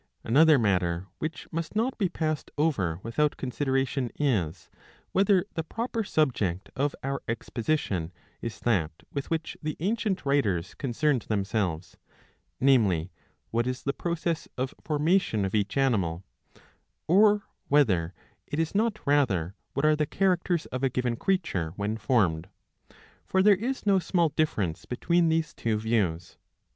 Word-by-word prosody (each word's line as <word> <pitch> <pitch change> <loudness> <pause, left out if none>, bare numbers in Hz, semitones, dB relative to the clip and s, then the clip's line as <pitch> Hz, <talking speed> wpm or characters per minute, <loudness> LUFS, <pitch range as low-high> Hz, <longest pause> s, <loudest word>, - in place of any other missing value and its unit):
^ - - -41 0.2
Another 150 +6 +6
matter 90 -6 +1
which 155 -1 -4
must 165 +3 -4
not 235 +5 +1
be 195 -4 +2
passed 155 -3 -2
over 100 - +1
without 145 +6 0
con 130 - -4
sideration 135 -2 0
is, 105 - -1 0.4
whether 195 -1 +3
the 165 - -2
proper 230 +6 -3
subject 110 - 0
of 140 +2 0
our 140 +1 -2
exposition 115 - -2 0.3
is 115 - -5
that 95 -10 +2 0.2
with 140 -1 -4
which 165 -1 -2
the 155 0 -3
ancient 200 -1 -1
writers 105 -11 +1
concerned 135 0 0
themselves, 100 -5 -1 0.6
namely, 105 -11 +3 0.4
what 120 +2 +1
is 125 0 -3
the 140 - 0
process 170 0 -2
of 130 +1 -2
formation 150 - +1
of 95 - -3
each 105 +3 0
animal; 95 -11 +1 0.8
or 205 +3 +5 0.2
whether 95 - +2 0.3
it 145 - -4
is 165 0 0
not 215 +1 +1
rather, 110 - +2 0.2
what 140 +3 +1
are 155 0 +5
the 150 -1 0
characters 180 -2 +1
of 130 - -2
a 135 - +3
given 125 -1 -1
creature 115 - -1
when 105 +2 -2
formed. 95 -8 +1 0.8
For 190 0 +3
there 210 0 +7
is 245 +7 -3
no 195 -2 +4
small 170 -2 +1
difference 110 - -1
between 170 +6 +1
these 160 -1 0
two 110 -2 -1
views. 100 -7 -1
135 Hz, 145 wpm, -27 LUFS, 105-165 Hz, 0.8 s, there